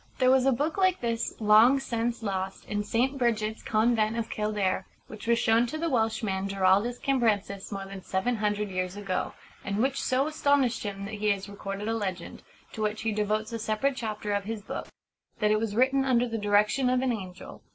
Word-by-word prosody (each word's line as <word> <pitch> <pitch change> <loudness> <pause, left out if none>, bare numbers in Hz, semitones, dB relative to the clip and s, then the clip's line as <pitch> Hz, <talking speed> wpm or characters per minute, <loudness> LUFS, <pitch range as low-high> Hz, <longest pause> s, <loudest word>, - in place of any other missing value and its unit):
There 255 0 +4
was 265 0 +4
a - - +5
book 300 +8 -1
like 370 -1 +3
this, 230 -1 -1
long 220 +5 +6
since 235 -2 -2
lost, 190 -2 -3
in 205 0 -2
St. 260 +6 0
Brigit's 220 -3 0
convent 220 0 +1
of 230 -1 -3
Kildare, 210 -3 -1 0.2
which 215 +1 -10
was 235 0 +4
shown 230 +1 +3
to 310 - -4
the 330 0 -1
Welshman 220 -5 0
Giraldus 195 +5 +2
Cambrensis 215 -8 0
more 195 -1 -4
than 195 0 -8
seven 190 +7 -1
hundred 210 -1 -1
years 185 0 -2
ago, 195 -3 -2 0.3
and 200 +1 -2
which 270 +4 +1
so 260 +1 +1
astonished 285 -5 +1
him 200 -1 -5
that 200 - -7
he 210 0 0
has 200 -1 0
recorded 200 0 -6
a 225 - 0
legend 190 -6 -4 0.3
to 220 - -5
which 215 0 -1
he 225 - 0
devotes 215 +2 -1
a 230 - -3
separate 225 +6 0
chapter 215 -3 -3
of 200 -1 -1
his 220 -1 -5
book - - -5 0.5
that 210 -2 +2
it 215 - +3
was 215 -2 -2
written 265 +3 +3
under 250 -2 +2
the 225 -1 -3
direction 210 +5 +2
of 255 0 +2
an 260 - +1
angel. 185 -4 -8
220 Hz, 205 wpm, -28 LUFS, 205-245 Hz, 0.5 s, long